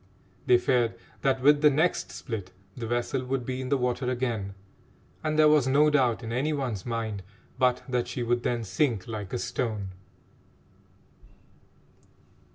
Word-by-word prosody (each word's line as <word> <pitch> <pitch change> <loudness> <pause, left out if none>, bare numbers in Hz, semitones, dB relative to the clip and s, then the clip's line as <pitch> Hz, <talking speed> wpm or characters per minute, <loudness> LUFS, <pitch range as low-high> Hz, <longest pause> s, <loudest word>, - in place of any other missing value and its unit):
They 125 - +7
feared 120 -1 +1 0.3
that 130 -1 +1
with 145 +1 +6
the 150 - +7
next 155 +5 +1
split 105 -7 -6 0.2
the 115 -2 -5
vessel 120 +2 -1
would 130 -1 -2
be 130 +1 -3
in 130 - -5
the 140 - +3
water 125 0 -1
again, 115 -6 -2 0.7
and 155 -1 0
there 155 0 +7
was 150 -4 +4
no 150 +3 +4
doubt 125 -5 +2
in 115 - -5
any 140 +6 0
one's 125 -9 -3
mind 110 -4 -3 0.4
but 125 -1 +2
that 125 -2 -1
she 120 0 -3
would 120 +1 +1
then 120 -1 -1
sink 110 -2 0
like 105 -4 -5
a - - -1
stone. 110 -5 -3
125 Hz, 160 wpm, -27 LUFS, 115-135 Hz, 0.7 s, They